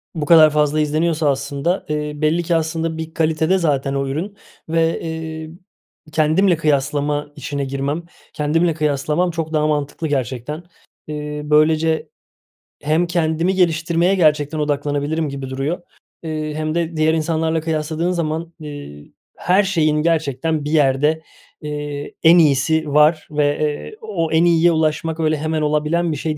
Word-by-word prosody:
bu 155 Hz, -2 st, -2 dB
kadar 155 Hz, 0 st, +7 dB
fazla 150 Hz, 0 st, +1 dB
izleniyorsa 155 Hz, 0 st, +1 dB
aslında, 140 Hz, +6 st, -1 dB
eee, 150 Hz, 0 st, -2 dB
belli 155 Hz, +3 st, +1 dB
ki 170 Hz, 0 st, 0 dB
aslında 160 Hz, 0 st, -1 dB
bir 160 Hz, 0 st, -6 dB
kalitede 160 Hz, +3 st, +1 dB
zaten 140 Hz, -5 st, 0 dB
o 140 Hz, 0 st, -1 dB
ürün 180 Hz, +9 st, -4 dB, 0.3 s
ve, 165 Hz, 0 st, +1 dB
eee, 160 Hz, -1 st, -5 dB, 0.6 s
kendimle 165 Hz, +4 st, +3 dB
kıyaslama 145 Hz, -1 st, 0 dB
işine 140 Hz, -1 st, -4 dB
girmem, 140 Hz, +4 st, -3 dB, 0.3 s
kendimle 165 Hz, +2 st, +1 dB
kıyaslamam 150 Hz, +3 st, 0 dB
çok 160 Hz, -1 st, -4 dB
daha 155 Hz, 0 st, +2 dB
mantıklı 150 Hz, +1 st, -2 dB
gerçekten. 135 Hz, +2 st, -3 dB, 0.4 s
Eee, 150 Hz, 0 st, -5 dB
böylece 155 Hz, +1 st, +2 dB, 0.7 s
hem 155 Hz, +4 st, +1 dB
kendimi 170 Hz, +1 st, 0 dB
geliştirmeye 170 Hz, +1 st, +2 dB
gerçekten 155 Hz, -3 st, +2 dB
odaklanabilirim 145 Hz, +1 st, -1 dB
gibi 135 Hz, -1 st, -6 dB
duruyor, 140 Hz, +7 st, -3 dB, 0.4 s
eee, 155 Hz, -1 st, -3 dB
hem 155 Hz, 0 st, -2 dB
de 170 Hz, -1 st, -1 dB
diğer 155 Hz, +1 st, +3 dB
insanlarla 160 Hz, 0 st, 0 dB
kıyasladığın 160 Hz, +2 st, -1 dB
zaman, 165 Hz, -1 st, -3 dB
eee, 145 Hz, -, -9 dB, 0.3 s
her 185 Hz, +3 st, +3 dB
şeyin 160 Hz, -6 st, +1 dB
gerçekten 160 Hz, -1 st, 0 dB
bir 150 Hz, -, -3 dB
yerde, 150 Hz, +1 st, +2 dB, 0.4 s
eee, 145 Hz, -1 st, -5 dB
en 165 Hz, +2 st, +7 dB
iyisi 155 Hz, +1 st, +2 dB
var 155 Hz, +1 st, +4 dB
ve, 145 Hz, -1 st, +1 dB
eee, 150 Hz, -, -3 dB
o 165 Hz, -, -2 dB
en 160 Hz, +1 st, +4 dB
iyiye 170 Hz, 0 st, +4 dB
ulaşmak 160 Hz, 0 st, 0 dB
öyle 155 Hz, -1 st, +1 dB
hemen 155 Hz, +1 st, -2 dB
olabilen 150 Hz, +3 st, +1 dB
bir 150 Hz, -, -3 dB
şey 155 Hz, 0 st, -3 dB
155 Hz, 145 wpm, -19 LUFS, 150-165 Hz, 0.7 s, kadar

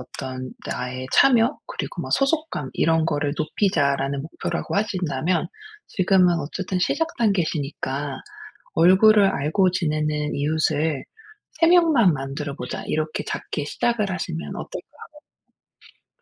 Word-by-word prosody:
어떤 130 Hz, 0 st, -7 dB
나의 130 Hz, 0 st, -4 dB
참여 250 Hz, 0 st, +4 dB
그리고 -, -, -5 dB
뭐 -, -, -7 dB
소속감 275 Hz, -, 0 dB
이런 160 Hz, 0 st, +2 dB
거를 145 Hz, -2 st, -1 dB
높이자.'라는 140 Hz, -5 st, 0 dB
목표라고 160 Hz, -, -4 dB
하신다면 180 Hz, -5 st, 0 dB, 0.4 s
지금은 185 Hz, -2 st, +3 dB
어쨌든 185 Hz, +5 st, -3 dB
시작 325 Hz, -, +1 dB
단계시니까 150 Hz, -, -1 dB, 0.6 s
'얼굴을 195 Hz, +5 st, +6 dB
알고 180 Hz, +3 st, +2 dB
지내는 150 Hz, -4 st, -1 dB
이웃을 155 Hz, 0 st, 0 dB, 0.6 s
3 330 Hz, -, +6 dB
명만 315 Hz, -, +5 dB
만들어 140 Hz, +1 st, -5 dB
보자.' 125 Hz, -, -5 dB
이렇게 155 Hz, 0 st, -2 dB
작게 150 Hz, -, -4 dB
시작을 220 Hz, +2 st, 0 dB
하시면 175 Hz, -3 st, -4 dB
어떨까 -, -, -7 dB, 1.2 s
하거든요? 485 Hz, -, -54 dB
160 Hz, 290 characters per minute, -23 LUFS, 145-195 Hz, 1.2 s, 얼굴을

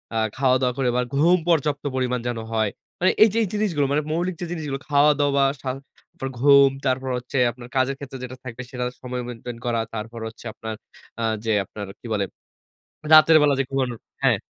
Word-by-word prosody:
আ -, -, +1 dB, 0.2 s
খাওয়া-দাওয়া 130 Hz, -2 st, +2 dB
করে 130 Hz, -2 st, +1 dB
আবার 125 Hz, 0 st, +1 dB
ঘুম 170 Hz, +5 st, +5 dB
পর্যাপ্ত 150 Hz, -3 st, +1 dB
পরিমাণ 125 Hz, -1 st, 0 dB
যেন 120 Hz, -1 st, -2 dB, 0.2 s
হয়। 110 Hz, -2 st, +1 dB, 0.3 s
মানে 185 Hz, -, +4 dB
এই 220 Hz, -, +6 dB
যে -, -, -1 dB
এই -, -, -1 dB
জিনিসগুলো 185 Hz, -9 st, +1 dB
মানে 150 Hz, +1 st, +2 dB
মৌলিক 175 Hz, +2 st, -1 dB
যে -, -, -2 dB
জিনিসগুলো 150 Hz, -5 st, -3 dB
খাওয়া-দাওয়া, 145 Hz, -1 st, +4 dB, 0.2 s
সা 130 Hz, -, -3 dB, 0.5 s
পর 135 Hz, -, -2 dB
ঘুম 140 Hz, 0 st, +7 dB, 0.2 s
তারপর 130 Hz, 0 st, 0 dB
হচ্ছে 125 Hz, +2 st, -5 dB
আপনার 120 Hz, 0 st, -12 dB
কাজের 135 Hz, +1 st, +2 dB
ক্ষেত্রে 135 Hz, -1 st, -8 dB
যেটা 130 Hz, 0 st, -7 dB
থাকবে 125 Hz, 0 st, -7 dB
সেটার 125 Hz, -1 st, -3 dB
সময় 125 Hz, -1 st, -4 dB
মেইনটেইন 120 Hz, 0 st, -7 dB
করা। 120 Hz, -1 st, 0 dB
তারপর 115 Hz, +2 st, -6 dB
হচ্ছে 110 Hz, +1 st, -12 dB
আপনার 110 Hz, -1 st, -6 dB, 0.5 s
আ -, -, 0 dB, 0.2 s
যে 110 Hz, -, +1 dB
আপনার 105 Hz, -1 st, -7 dB
কি -, -, -18 dB
বলে 100 Hz, -2 st, 0 dB, 0.9 s
রাতের 155 Hz, +1 st, +9 dB
বেলা 145 Hz, -1 st, +4 dB
যে -, -, +3 dB
ঘুমানোর 130 Hz, -4 st, -1 dB, 0.2 s
হ্যাঁ। -, -, +4 dB
130 Hz, 190 wpm, -23 LUFS, 125-145 Hz, 0.9 s, রাতের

